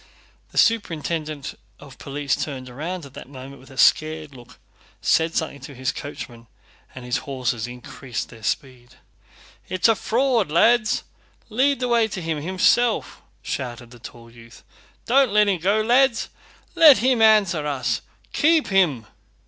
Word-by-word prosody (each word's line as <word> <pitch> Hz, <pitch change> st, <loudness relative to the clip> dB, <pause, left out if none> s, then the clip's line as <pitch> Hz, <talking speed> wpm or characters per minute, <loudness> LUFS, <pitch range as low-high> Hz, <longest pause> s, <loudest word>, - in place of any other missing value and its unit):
The -, -, -12 dB
superintendent 160 Hz, -8 st, 0 dB, 0.3 s
of 140 Hz, -2 st, -14 dB
police 140 Hz, -1 st, -2 dB
turned 130 Hz, -4 st, -5 dB
round 160 Hz, +6 st, -6 dB
at 135 Hz, -, -14 dB
that -, -, -11 dB
moment 135 Hz, 0 st, -11 dB
with 130 Hz, -, -17 dB
a 135 Hz, -, -14 dB
scared 155 Hz, -1 st, +2 dB
look, 125 Hz, 0 st, -15 dB, 0.4 s
said 160 Hz, 0 st, +1 dB
something 155 Hz, -3 st, -2 dB
to 140 Hz, +1 st, -11 dB
his 130 Hz, +1 st, -2 dB
coachman, 120 Hz, -5 st, -9 dB, 0.5 s
and 125 Hz, -1 st, -9 dB
his 125 Hz, -, -1 dB
horses 125 Hz, -4 st, -3 dB
increased 125 Hz, 0 st, -7 dB
their 115 Hz, -, -14 dB
speed. 120 Hz, +3 st, -4 dB, 0.7 s
"It's 185 Hz, +3 st, +2 dB
a 225 Hz, -, +5 dB
fraud, 235 Hz, -, 0 dB
lads! 220 Hz, +8 st, +3 dB, 0.5 s
Lead 270 Hz, +5 st, +1 dB
the 250 Hz, -, 0 dB
way 235 Hz, -2 st, +2 dB
to 195 Hz, -, -6 dB
him, 160 Hz, -3 st, -3 dB
himself!" 190 Hz, +7 st, +1 dB, 0.2 s
shouted 120 Hz, -2 st, -5 dB
the 120 Hz, -, -14 dB
tall 115 Hz, 0 st, -12 dB
youth. 115 Hz, 0 st, -16 dB, 0.4 s
"Don't 265 Hz, 0 st, +3 dB
let 210 Hz, 0 st, +4 dB
him 190 Hz, -3 st, +1 dB
go, 200 Hz, +5 st, +2 dB
lads! 240 Hz, 0 st, +2 dB, 0.4 s
Let 305 Hz, -5 st, +8 dB
him 250 Hz, -1 st, +1 dB
answer 200 Hz, -9 st, +4 dB
us! 140 Hz, -3 st, -2 dB, 0.3 s
Keep 315 Hz, +1 st, +2 dB
him!" 170 Hz, -, +2 dB
155 Hz, 150 wpm, -22 LUFS, 130-220 Hz, 0.7 s, Let